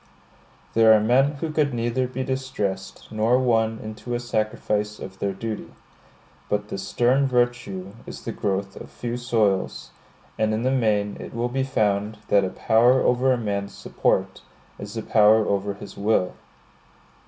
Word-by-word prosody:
There 110 -1 +6
are - - +4
men 130 +7 +3
who 155 +2 -4
could 150 -4 +1
neither 120 +2 0
be 130 +1 -4
distressed 115 -8 -4
nor 110 +3 +2
won 115 -3 +2
into 110 +3 -5
a - - -1
sacrifice 110 -2 -1
of 95 0 -9
their 100 - 0
duty; 110 +3 -6 0.8
but 105 0 -1
this 95 0 -5
stern 130 +6 +2
virtue 120 -7 -1 0.2
is - - -8
the - - -3
growth 95 -1 -2
of - - -10
few 120 0 -5
soils; 110 -6 0 0.5
and 110 0 +2
in 110 - -2
the 130 - +2
main 105 -5 +1
it - - -8
will 120 +1 -1
be 135 +2 -1
found 105 -5 0
that 100 -1 +4
a 95 - -1
power 115 +6 +3
over 125 +2 +3
a 125 - +2
man's 100 -3 -3
support - - -1 0.4
is 100 +2 -7
a 110 - -3
power 110 0 +5
over 100 0 -1
his - - -10
will. 100 -3 +1
110 Hz, 165 wpm, -24 LUFS, 105-125 Hz, 0.8 s, There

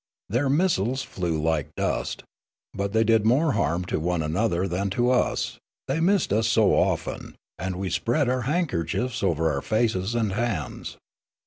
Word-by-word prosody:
Their 125 +7 +1
missiles 135 - +1
flew 85 -4 -2
like 80 -2 -1
dust. - - -2 0.5
But 100 0 -2
they 110 +1 +3
did 115 -1 +3
more 135 +8 +3
harm 85 - 0
to - - -2
one 85 0 0
another 90 +3 0
than 95 +3 -1
tons, 125 +5 +1 0.3
they 135 +4 0
missed 185 - +2
us 110 +1 +2
so 110 -3 +4
often,' - - -1 0.2
and 95 0 -3
we 95 0 -3
spread 125 - +1
our 130 0 +1
handkerchiefs 125 - -1
over 80 -4 +1
our 70 - -2
faces 110 -1 0
and 110 -4 0
hands. 105 -8 -3
110 Hz, 155 wpm, -25 LUFS, 90-125 Hz, 0.5 s, so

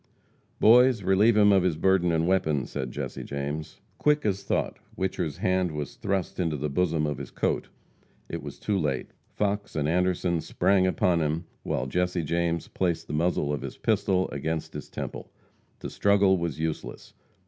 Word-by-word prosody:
"Boys, 120 -1 +6
relieve 105 +4 +4
him 105 -1 +6
of 95 -1 +5
his 90 -4 0
burden 90 0 +3
and 80 0 +1
weapons," 80 -8 +1
said 65 - -3
Jesse - - -5
James. 75 +3 -5 0.2
Quick 150 -2 +2
as 100 -2 0
thought, 100 - -2 0.2
Whicher's 90 -5 -2
hand 95 -2 +1
was 75 +9 -4
thrust 100 -6 -2
into 80 -4 0
the 75 +1 -3
bosom 80 -1 +1
of 75 -3 -3
his - - -7
coat. - - -1 0.6
It - - -5
was - - -8
too 100 -2 -1
late. 70 -6 -2 0.2
Fox 100 0 -1
and 75 -2 0
Anderson 90 0 +1
sprang 95 +2 +2
upon 90 -2 +2
him, 80 +3 -1 0.2
while 65 - -2
Jesse 90 +4 0
James 85 +1 -1
placed 85 -3 -1
the - - -7
muzzle 75 -2 +1
of 70 - -3
his - - -7
pistol 95 -1 +1
against 80 +3 -3
his - - -7
temple. - - -6 0.5
To - - -5
struggle 100 -1 +4
was 85 -5 -3
useless. 80 -1 -4
90 Hz, 170 wpm, -27 LUFS, 80-95 Hz, 0.6 s, Boys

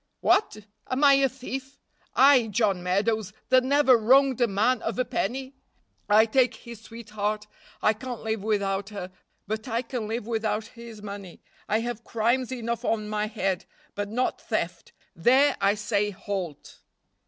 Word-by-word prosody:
"What! 370 - +2 0.3
am 260 +3 0
I 280 -1 +8
a 275 -1 +4
thief? 265 +1 -7 0.4
I, 265 -3 +6
John 205 -3 +1
Meadows, 200 +3 0 0.2
that 255 -1 +5
never 275 -1 +5
wronged 260 +3 +4
a 240 - +5
man 220 +5 +1
of - - -3
a 255 - +1
penny? 260 +4 -3 0.6
I 215 +2 +6
take 250 +2 +2
his 235 -3 -11
sweetheart, 215 -2 -4 0.4
I 215 - +4
can't 245 +2 -7
live 220 -2 -2
without 200 -2 -1
her; 195 -3 -7 0.3
but 220 +4 -4
I 235 +1 -1
can 235 -3 -4
live 225 0 -3
without 220 -1 -1
his 230 -3 -11
money. 200 -3 -9 0.3
I 215 +2 +2
have 235 -1 -4
crimes 235 +3 0
enough 235 -2 -3
on 215 -2 -1
my 210 0 -1
head, 195 -3 -2 0.3
but 205 0 -4
not 250 +4 -1
theft, 180 -6 -3 0.2
there 260 +11 +4
I 200 +1 +3
say 210 -1 0
halt." 190 -5 -6
225 Hz, 160 wpm, -26 LUFS, 205-255 Hz, 0.6 s, I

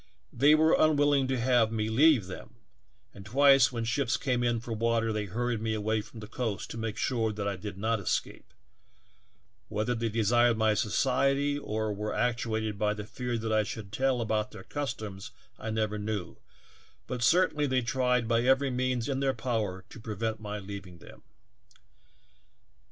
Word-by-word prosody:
They 145 +2 +5
were 160 +1 +4
unwilling 145 -3 +3
to 130 -1 -1
have 120 -2 +3
me 110 -1 -1
leave 130 - +4
them, 95 - -10 0.6
and 100 - -11
twice 135 +3 +5
when 115 -2 -3
ships 120 +2 0
came 125 -3 -1
in 120 -1 +1
for 115 0 -6
water 115 0 0
they 105 -1 -2
hur 120 +6 -2
ried 115 -3 -2
me 110 -1 -1
away 110 +1 0
from 110 +1 -12
the 105 - -8
coast 110 -4 -4
to - - -6
make 110 -1 -3
sure 115 -2 0
that 105 -1 -4
I 100 - -1
did 95 +1 -7
not 110 +2 0
escape; 100 - -3 1.2
whether 110 +3 -1
they 115 -1 -1
desired 115 +2 +3
my 110 -1 +3
society 135 +6 +1
or 110 -4 -2
were 105 +1 -4
actuated 110 -3 -1
by 105 0 +1
the 105 -1 -6
fear 120 +2 -3
that 110 0 -2
I 110 - +4
should 105 -1 -6
tell 130 +2 +1
about 110 -1 -1
their - - -11
customs 110 -8 -5 0.3
I 110 - -5
never 110 -1 -1
knew, 105 -3 -4 0.7
but 125 -1 -5
certainly 150 +2 +3
they 130 -2 +1
tried 125 -1 +1
by 115 0 +2
every 135 +2 +3
means 125 -1 -1
in 135 -2 -1
their 135 -1 +1
power 105 -7 -2
to - - -12
pre 110 -1 -6
vent 110 +1 -2
my 105 -1 -5
leaving 100 -3 -8
them. 80 - -15
115 Hz, 180 wpm, -29 LUFS, 105-125 Hz, 1.2 s, They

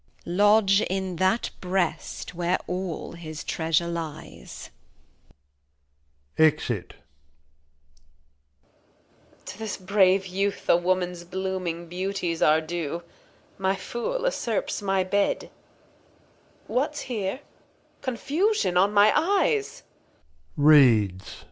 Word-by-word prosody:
Lodge 205 +2 +4
in 190 -1 -2
that 190 +6 +1
Breast 180 -2 -2
where 175 +1 0
aU 180 -2 -4
his 155 -3 -8
Treasure 165 +1 0
lies. 165 -2 -7 1.7
[Exit. 135 - +1 1.7
Reg. - - -34
To 190 - -9
this 220 -2 -4
brave 190 0 +3
Youth 195 +2 -2
a - - +6
Woman's 180 0 -1
blooming 185 -2 -4
Beauties 180 -1 -3
Are 155 +1 +4
due; 170 0 -4 0.6
my 190 0 +1
Fool 240 - -4
usurps 245 - -1
my 195 -1 +1
Bed 200 +2 0 1.1
What's 295 +4 -1
here? 220 +1 -3 0.6
Confusion 275 - 0
on 195 +3 +4
my 205 +1 +5
Eyes. 405 +6 +1 0.7
[Reads. 115 -11 +4
185 Hz, 90 wpm, -25 LUFS, 170-205 Hz, 1.7 s, a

